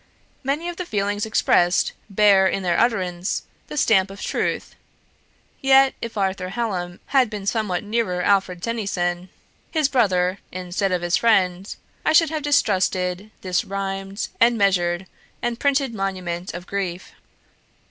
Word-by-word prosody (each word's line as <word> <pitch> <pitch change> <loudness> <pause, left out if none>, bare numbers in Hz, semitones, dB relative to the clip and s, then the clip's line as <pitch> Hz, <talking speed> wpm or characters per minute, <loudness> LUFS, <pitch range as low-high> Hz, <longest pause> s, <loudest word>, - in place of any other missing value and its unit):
Many 290 +6 -1
of 350 -1 -5
the 360 - -4
feelings 205 -1 -1
expressed 175 -4 +3 0.2
bear, 200 -1 +5
in 195 0 -1
their 175 -2 +1
utterance, 185 -6 0 0.2
the 300 - -7
stamp 195 -8 +3
of 195 +1 -10
truth; - - -2 0.9
yet, 270 0 +5
if 230 -2 -6
Arthur 190 -2 -1
Hallam 185 -5 -3
had 260 -4 +4
been 210 -2 -6
somewhat 210 -4 -1
nearer 210 -4 -1
Alfred 190 -3 +1
Tennyson, 185 -6 -2 0.4
his 310 -4 +2
brother 190 -8 +1
instead 185 +2 -2
of 180 -1 0
his 175 +1 +2
friend, 190 -4 +2 0.3
I - - +2
should 320 -1 +5
have 310 -1 -2
distrusted 190 -8 +1
this 185 -1 0
rhymed, 195 +1 -4
and 235 0 +4
measured, 180 -3 +1 0.3
and 240 -1 -2
printed 275 -3 +1
monument 185 -3 -3
of 175 +1 -7
grief. 185 -3 -4
195 Hz, 140 wpm, -22 LUFS, 180-230 Hz, 0.9 s, bear